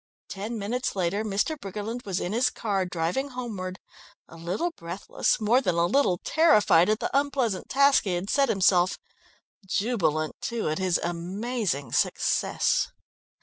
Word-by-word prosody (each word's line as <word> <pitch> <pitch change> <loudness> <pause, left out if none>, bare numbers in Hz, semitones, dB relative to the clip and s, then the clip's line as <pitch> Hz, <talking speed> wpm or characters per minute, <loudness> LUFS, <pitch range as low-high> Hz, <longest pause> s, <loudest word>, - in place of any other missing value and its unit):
Ten 210 +4 -5
minutes 235 +5 -2
later 190 +3 0
Mr. 210 +9 0
Briggerland 210 +4 -5
was 195 -2 -2
in 180 - -3
his 240 +3 +3
car 195 -4 -2
driving 180 +11 -2
homeward, 210 -8 -5 0.5
a - - -14
little 180 - -2
breathless, 175 - -2
more 230 +4 +3
than 180 -9 0
a 170 0 +3
little 190 -2 +2
terrified 210 - +4
at 215 +1 +2
the - - -3
unpleasant 275 -8 0
task 280 -1 +4
he 185 -3 0
had 175 +3 -3
set 275 +3 +2
himself; 185 -3 +3 0.7
jubilant, 185 -7 0
too, 235 -2 -2
at 155 - -2
his 185 -2 +1
amazing 180 - -3
success. - - +1
200 Hz, 145 wpm, -26 LUFS, 180-245 Hz, 0.7 s, terrified